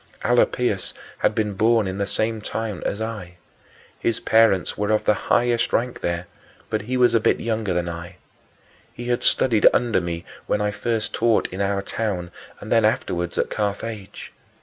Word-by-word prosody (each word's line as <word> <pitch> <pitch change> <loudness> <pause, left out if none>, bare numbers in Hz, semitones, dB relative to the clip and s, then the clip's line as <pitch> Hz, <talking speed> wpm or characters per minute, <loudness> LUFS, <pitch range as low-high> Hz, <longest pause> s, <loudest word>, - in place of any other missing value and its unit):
Alypius 120 -4 +1 0.2
had - - +2
been 105 -2 0
born 110 +2 +3
in 95 +1 -4
the 100 - 0
same 110 +1 0
town 110 -3 -4
as 100 - -3
I; 105 -6 -5 0.6
his 115 -1 0
parents 110 -5 +3
were 105 0 -2
of 110 0 +2
the - - +4 0.2
highest 120 -1 +2
rank 125 +1 -1
there, 85 0 -2 0.5
but 110 - 0
he 125 +5 -2
was 125 -1 +4
a 115 - +5
bit - - +2
younger 110 -3 -1
than 90 -1 0
I. 85 +1 -7 0.8
He 120 +1 -7
had 120 - +1
studied 115 -5 +4
under 120 -6 +1
me 85 -1 -4 0.2
when - - +1
I 105 0 0
first 115 +1 -2
taught 115 -1 +2
in 95 +2 -5
our 100 0 0
town, 95 -5 -3 0.3
and 105 - -9
then 115 -1 +4
afterward 90 -5 0
at - - 0
Carthage. 105 -1 -4
110 Hz, 175 wpm, -23 LUFS, 95-115 Hz, 0.8 s, a